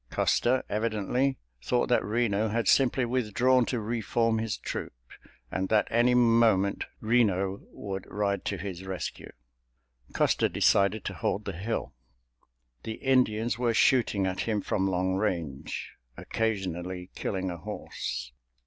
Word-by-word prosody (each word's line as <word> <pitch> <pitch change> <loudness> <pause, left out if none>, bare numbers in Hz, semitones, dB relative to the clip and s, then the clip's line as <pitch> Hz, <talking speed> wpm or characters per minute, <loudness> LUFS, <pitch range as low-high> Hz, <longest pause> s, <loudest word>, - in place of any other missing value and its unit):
Custer, 130 +2 +2
evidently, 115 +5 0 0.3
thought 120 - +1
that 125 - +3
Reno 110 -1 +1
had 115 +2 -1
simply 130 -1 +4
withdrawn 125 +1 +2
to 125 - -1
re 115 +2 -2
form 115 +1 +1
his 110 -3 -2
troop, - - -5 0.6
and 95 0 -2
that 110 -1 +3
any 120 +2 +4
moment 115 -5 +3 0.2
Reno 100 -4 +2
would 95 -2 -6
ride 100 -1 -1
to 100 - -1
his 95 -1 -6
rescue. 95 -1 -5 0.8
Custer - - +2
decided 100 +2 +2
to - - -3
hold 105 +3 -2
the 100 - -2
hill. 100 +7 -3 0.9
The 110 - -5
Indians 120 -3 +1
were 120 -2 +1
shooting 115 -8 +3
at 95 0 -2
him 110 -2 0
from 95 -1 0
long 95 0 0
range, 80 -8 -3 0.3
occasionally 95 -4 -3
killing 95 -2 -3
a 85 - -6
horse. 65 - -5
105 Hz, 135 wpm, -28 LUFS, 95-120 Hz, 0.9 s, simply